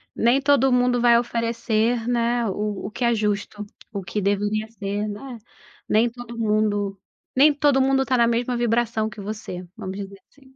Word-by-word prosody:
nem 240 +4 +3
todo 270 -2 +3
mundo 245 -1 +2
vai 235 -1 +6
oferecer, 230 0 -1
né. 240 0 +1
O 205 0 -3
o - - -8
que 245 - -4
é 235 - +3
justo, 210 0 -2 0.3
o 200 - -3
que 205 +3 -3
deveria 205 +2 0
ser, 205 -1 -3
né, 230 +4 -7 0.5
nem 225 +3 +3
todo 235 0 -10
mundo 210 -3 0 0.4
nem 290 +3 +6
todo 285 -2 +3
mundo 270 0 +3
está 260 -2 +1
na 235 0 +4
mesma 240 +1 0
vibração 230 -2 0
que 205 0 -10
você, 195 -3 -6
vamos 190 +1 -6
dizer 195 -1 -8
assim. 265 -2 -23
230 Hz, 175 wpm, -23 LUFS, 210-245 Hz, 0.5 s, vai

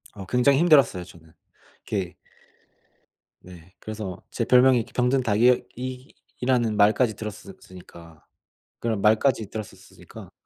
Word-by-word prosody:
어 100 -2 -9
굉장히 125 +6 +2
힘들었어요 140 - +4
저는. 85 -2 -17 0.5
이게 95 -4 -4 1.2
네. 90 0 -16
그래서 105 -4 -7
제 - - -3
별명이 125 0 +5
이렇게 115 - -5
병든 125 +2 +1
닭이 120 +3 +3
이 130 +1 -8 0.3
이라는 120 -4 +1
말까지 110 +2 +3
들었었으니까. 90 -5 -12 0.5
그런 110 -3 -2
말까지 110 0 +2
들었었으니까. 110 -2 -11
110 Hz, 300 characters per minute, -24 LUFS, 95-125 Hz, 1.2 s, 별명이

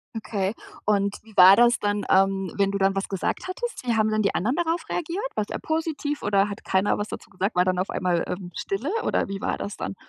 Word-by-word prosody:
Okay. 205 -2 -2 0.3
Und 200 -1 +1
wie 220 -2 -18
war 185 +2 +9
das 240 0 +5
dann, 205 -1 -1
ähm, 195 -2 +2
wenn 200 0 +2
du 200 - -1
dann 195 0 +2
was 195 - -2
gesagt 195 - -2
hattest? 475 - -5
Wie 235 -2 +1
haben 215 0 +3
denn 215 0 +1
die 200 - +1
anderen 230 - 0
darauf 340 0 -1
reagiert? 350 +6 -3
War's 210 - -2
eher - - -4
positiv? 315 -2 -2
Oder 200 0 +2
hat 205 - -7
keiner 190 +2 +1
was 205 +1 -3
dazu - - -8
gesagt? 195 +1 -2
War 180 +1 +4
dann 185 -1 +1
auf 185 - -1
einmal, 180 -2 0
ähm, 180 -1 -5
Stille? 230 +10 -3
Oder - - 0
wie 195 0 -5
war - - -1
das 200 - -5
dann? - - -5
200 Hz, 240 wpm, -25 LUFS, 195-235 Hz, 0.3 s, war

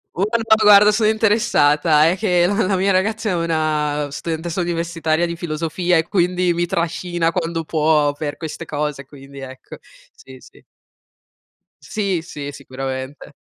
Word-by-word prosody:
Guarda, 220 +4 +2
guarda 210 0 +7
sono 215 0 +2
interessata, 165 -9 +3
è 175 - +2
che 180 -4 +2
la 190 - +1
la 195 - +1
mia 195 +2 +1
ragazza 215 +4 0
è - - 0
una 155 -3 -1
studentessa 165 +4 -4
universitaria 170 -1 -1
di 170 0 -4
filosofia 170 +2 -1
e 160 +1 0
quindi 180 -2 +1
mi 175 +1 -1
trascina 170 0 -1
quando 165 -2 -3
può 155 -2 +1
per 145 0 -5
queste 160 -2 -7
cose, 150 -2 -4
quindi 140 0 -13
ecco. 130 -1 -10 0.4
Sì, 130 0 -15
sì. - - -19 1.2
Sì, 195 -5 -2
sì, 145 -4 -7
sicuramente. 135 +1 -7
165 Hz, 140 wpm, -19 LUFS, 150-185 Hz, 1.2 s, guarda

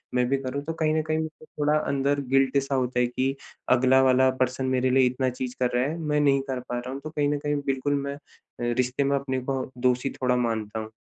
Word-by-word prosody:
मैं 125 - +3
भी 135 - +2
करूँ 130 +2 -3
तो 165 - -3
कहीं 155 0 +3
न 155 - +2
कहीं 155 0 +1
मुझे 155 0 -6
थोड़ा 150 0 0
अंदर 140 0 0
गिल्ट 135 0 +4
सा 135 0 -2
होता 125 -1 0
है 125 - +3
कि 130 +2 -1 0.4
अगला 130 +1 +4
वाला 130 0 +5
पर्सन 130 +1 0
मेरे 130 0 +2
लिए 130 0 +4
इतना 130 +1 0
चीज़ 125 0 -5
कर 125 -1 +1
रहा 125 - +3
है, 160 - -3
मैं 150 -2 0
नहीं 140 -2 +3
कर 130 - -2
पा 120 - -2
रहा 125 +1 -6
हूँ 140 - -6
तो 155 - -5
कहीं 145 -2 0
न 145 - 0
कहीं 145 0 -1
बिल्कुल 135 +1 0
मैं 140 0 -3
अ, - - -14 0.4
रिश्ते 125 +3 0
में 140 0 +1
अपने 130 -1 -2
को 135 -1 0 0.2
दोषी 125 +2 +1
थोड़ा 125 -1 +2
मानता 110 -3 -1
हूँ। 110 0 -7
130 Hz, 250 wpm, -26 LUFS, 125-140 Hz, 0.4 s, वाला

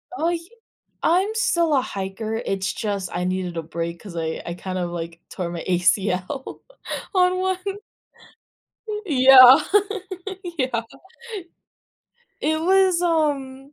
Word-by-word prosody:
Oh, 330 -2 0
y 345 - 0 0.7
I'm 370 +5 +3
still 340 -10 +2
a 265 - +3
hiker, 205 0 -4
it's 195 -3 -2
just 200 -4 -3
I 180 - -2
needed 180 -1 -2
a 165 - -2
break 170 +1 -5
'cause 195 -5 -10
I 160 -1 -3
I 170 - -4
kind 185 +1 -5
of, 175 -1 -2
like, 170 -1 -6
tore 180 -3 -4
my 170 -1 -5
ACL 185 +6 0 0.5
on 365 -1 +3
one, 375 0 0 1.5
yeah, 260 -3 +8 1.0
yeah. 255 -4 0 1.6
It 315 0 0
was, 375 0 +3
um 285 -5 -1
230 Hz, 120 wpm, -23 LUFS, -, 1.6 s, yeah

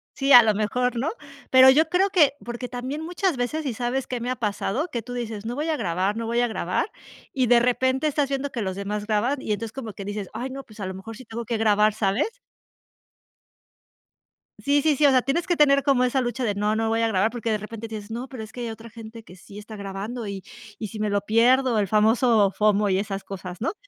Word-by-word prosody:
Sí, 275 0 0
a 245 -3 +11
lo 220 -1 +3
mejor 245 +4 0
¿no? 270 +7 0 0.4
Pero 260 0 +8
yo 315 +4 +3
creo 370 +3 +2
que 305 -7 +4
porque 240 +1 -5
también 260 +5 -5
muchas 355 +1 -1
veces 280 +6 -2
y 265 - -1
sabes 245 +3 -2
qué 250 - -4
me 245 - -3
ha 255 - -1
pasado, 225 - -2
que 235 - -3
tú 245 +3 -9
dices: 225 -4 -5
"No 240 - -3
voy 300 +4 -2
a 315 - 0
grabar, 190 0 -1
no 230 0 -3
voy 235 +1 0
a 245 - +2
grabar", 215 - -2 0.4
y 260 -2 +1
de 240 +1 +6
repente 260 +3 +1
estás 290 -2 0
viendo 275 0 -2
que 235 - -4
los 190 -2 -3
demás 205 +1 -4
graban. 235 +6 0
Y 215 - -1
entonces 220 +1 -4
como 230 -6 -6
que 195 - -8
dices: 205 -1 -5
"Ay, 260 +2 -4
no, 270 +1 -7
pues 215 -3 -17
a 200 - -3
lo 190 - -4
mejor 210 +4 -9
sí 255 - -12
tengo 230 +1 -6
que 230 +1 -2
grabar", 215 -1 +3
¿sabes? 200 - 0 2.3
Sí, 285 0 +2
sí, 310 -2 +3
sí, 295 - +3
o - - +6
sea, 255 -2 +3
tienes 275 +6 -1
que 350 - +2
tener 280 -2 +5
como 270 -3 +3
esa 250 +1 +1
lucha 245 +1 -3
de: 215 -4 0
"No, 210 +2 0
no 225 0 0
voy 225 +1 +1
a 230 - +2
grabar", 215 +1 +1
porque 235 -1 -4
de 215 - +1
repente 220 +2 -8
dices: 215 -1 -8
"No, 240 +3 -5
pero 255 -5 -7
es 215 - -11
que 245 - -8
hay 235 - -3
otra 225 +1 -9
gente 225 0 -11
que 180 - -14
sí 195 +2 -14
está 215 +1 -9
grabando 205 +4 -5
y 195 -1 -6 0.3
y 215 - -5
si 215 - -8
me 215 - 0
lo 200 0 +1
pierdo". 235 +3 +3
El 200 - 0
famoso 220 0 +3
FOMO 210 0 +2
y 190 0 +2
esas 200 -1 -4
cosas, 185 -1 -8
¿no? 265 - -1
230 Hz, 250 wpm, -24 LUFS, 210-260 Hz, 2.3 s, a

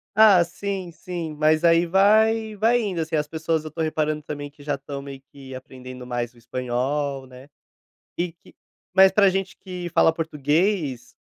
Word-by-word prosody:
Ah, 205 -4 +7
sim, 190 +1 -5
sim, 170 -2 -6
mas 155 +1 +2
aí 170 0 +5
vai 215 +4 +3
vai 230 +4 +2
indo, 195 -6 -3
assim, 160 0 -3
as 150 -1 0
pessoas, 160 0 -2
eu 155 - -6
tô - - -11
reparando 155 -1 -1
também 145 -1 -6
que 145 0 -17
já 145 0 -1
estão 140 0 -7
meio 135 -1 -9
que 135 -2 -11
aprendendo 130 -1 -10
mais 120 -1 -3
o - - -24
espanhol, 130 +3 -3
né. 130 +1 -14 0.7
E 175 0 -2
que 170 - -21 0.4
mas 190 0 +7
pra 200 0 +5
gente 195 0 -2
que 180 -2 -6
fala 160 - +4
português, 155 - -1
155 Hz, 175 wpm, -23 LUFS, 140-185 Hz, 0.7 s, Ah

